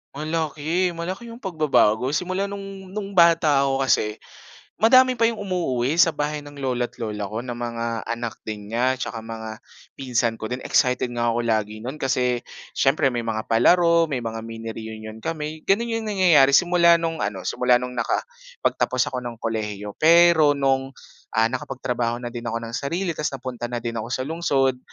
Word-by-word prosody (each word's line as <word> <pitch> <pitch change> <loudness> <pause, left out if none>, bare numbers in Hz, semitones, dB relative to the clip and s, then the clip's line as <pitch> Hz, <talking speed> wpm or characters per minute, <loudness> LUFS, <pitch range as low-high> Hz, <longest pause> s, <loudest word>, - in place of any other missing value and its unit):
Malaki, 160 +3 -1
malaki 185 +7 -5
'yong 230 +1 -10
pagbabago. 140 - +2
Simula 185 +4 -1
no'ng 195 -1 -8
no'ng 200 -1 -4
bata 165 -6 +4
ako 135 0 0
kasi, 105 -5 +1 0.6
madami 255 +3 +5
pa 230 - 0
'yong 230 -1 +2
umuuwi 165 -9 -1
sa 170 -1 +5
bahay 150 0 -3
ng 145 -1 -11
lolo't 125 -2 -2
lola 105 -2 -3
ko 110 - -3
na 120 0 -5
mga 115 -1 -3
anak 115 -1 -4
din 105 -1 -6
niya 125 +4 0
tsaka 110 -1 -5
mga 110 0 -8 0.3
pinsan 120 -3 0
ko 110 +1 -7
din. 125 - -2
Excited 125 0 +2
nga 120 0 +1
ako 120 0 -1
lagi 110 -1 -1
no'n 125 +6 -6
kasi 125 -3 0 0.3
siyempre 135 +1 +3
may 120 -2 -2
mga 110 -1 -3
palaro, 170 +8 +4
may 130 - 0
mga 115 -1 -5
mini 115 0 -7
reunion 110 0 -8
kami. 155 -1 -4
Gano'n 230 +5 +2
'yong 220 -1 -3
nangyayari 165 -9 +5
simula 170 +2 +5
no'ng 165 -4 -2
ano, 100 -3 -4
simula 125 -1 +3
no'ng 125 0 -6
nakapagtapos - - -1
ako 125 -1 -4
ng 120 -1 -5
kolehiyo. 105 -3 -4
Pero 165 -2 +6
no'ng, 135 -1 0 0.4
ah, 115 0 +4
nakapagtrabaho 125 -2 -2
na 120 - -4
din 120 0 -7
ako 115 0 -1
ng 115 +1 -5
sarili 170 +6 -2
ta's 150 -1 -2
napunta 125 -2 -5
na 120 -1 -4
din 115 0 -3
ako 110 - -5
sa 130 - -1
lungsod, 135 -5 0
130 Hz, 175 wpm, -23 LUFS, 115-170 Hz, 0.6 s, Pero